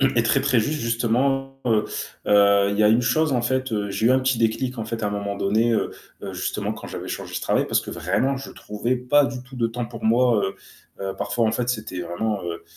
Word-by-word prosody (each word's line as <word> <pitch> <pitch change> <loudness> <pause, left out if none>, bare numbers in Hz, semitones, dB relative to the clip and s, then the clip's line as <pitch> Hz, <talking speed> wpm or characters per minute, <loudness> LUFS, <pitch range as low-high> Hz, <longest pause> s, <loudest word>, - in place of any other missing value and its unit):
est 130 -3 +3
très 125 +4 +3
très 130 -4 +3
ju 145 +8 -1
ste 150 - -3
justement, 135 +4 0
heu 110 -3 +3 0.4
heu, 100 -1 +5
il 100 - -2
y - - +4
a 105 - +6
une 115 +3 +4
chose 155 +4 +2
en 120 -2 +1
fait, 120 -5 -1
j'ai 110 +3 0
eu - - +5
un 130 - +4
petit 130 -2 +1
déclic 120 +3 0
en 110 - -2
fait 115 0 -4
à 105 - +1
un - - -3
moment 100 0 -3
donné, 110 +4 +2
heu - - 0 0.3
heu, - - -5
justement - - -2
quand - - -9
j'avais - - -6
changé - - -5
ce - - -2
travail - - +1
parce - - +2
que - - -7
vraiment 130 - 0
je 135 - -8
trouvais 110 +4 -2
pas 135 +3 +3
du 125 -2 -5
tout 130 +1 -13
de 115 -2 +1
temps 120 +1 -4
pour 115 0 -9
moi, 115 -1 +4
heu 95 - -3 0.5
heu, 95 - -3
parfois 115 -2 0
en 110 - +1
fait 120 +2 -1
c'était 110 -6 -3
vraiment, 100 +4 -2
heu 85 -1 -5
115 Hz, 255 wpm, -23 LUFS, 105-130 Hz, 0.5 s, a